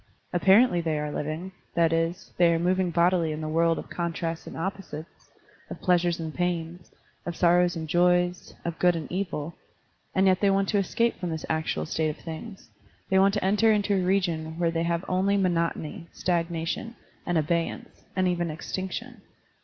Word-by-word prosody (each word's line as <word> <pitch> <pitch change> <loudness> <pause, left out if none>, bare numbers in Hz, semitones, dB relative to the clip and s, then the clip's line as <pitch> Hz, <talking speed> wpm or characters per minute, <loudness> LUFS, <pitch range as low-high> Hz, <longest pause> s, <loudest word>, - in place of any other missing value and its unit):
Apparently 190 +1 +5
they 160 -2 -1
are 150 0 -3
living, 155 +6 -4 0.2
that 165 -1 +3
is, 165 +2 -1
they 175 -1 +5
are 165 - +2
moving 180 +2 +1
bodily 170 -1 +2
in 155 - -4
the 155 - -4
world 165 +1 +2
of - - -6
contrasts 165 -1 -3
and - - -8
opposites, 170 -3 -6 0.4
of - - -7
pleas 180 -2 +3
ures 175 -1 0
and 160 -1 -4
pains, 175 -1 -3 0.3
of 175 - -4
sorrows 175 0 +3
and 160 -1 -4
joys, 180 +1 +2
of 170 -1 -3
good 180 -1 +4
and 160 -2 -5
evil; 170 -4 -3 0.6
and 190 - +4
yet 185 -1 +4
they 200 - +4
want 195 0 +2
to 205 - +2
escape 230 +4 0
from 180 -1 -3
this 160 -1 -4
actual 160 - -1
state 155 - 0
of 150 - -5
things, 180 +5 -9 0.4
they 190 - +5
want 195 +2 +4
to 205 - -1
enter 210 +3 +4
into 205 -1 +2
a 190 - +2
region 170 -4 0
where 170 -1 +1
they 165 0 -1
have 170 +1 -1
only 195 +2 +2
monotony, 170 -3 -1
stag 170 -2 0
nation, 170 +8 -3 0.3
and 175 - +1
abeyance, 165 +2 -2
and 185 -1 +2
even 175 -1 0
extinction. 190 +8 -5
175 Hz, 185 wpm, -27 LUFS, 165-190 Hz, 0.6 s, Apparently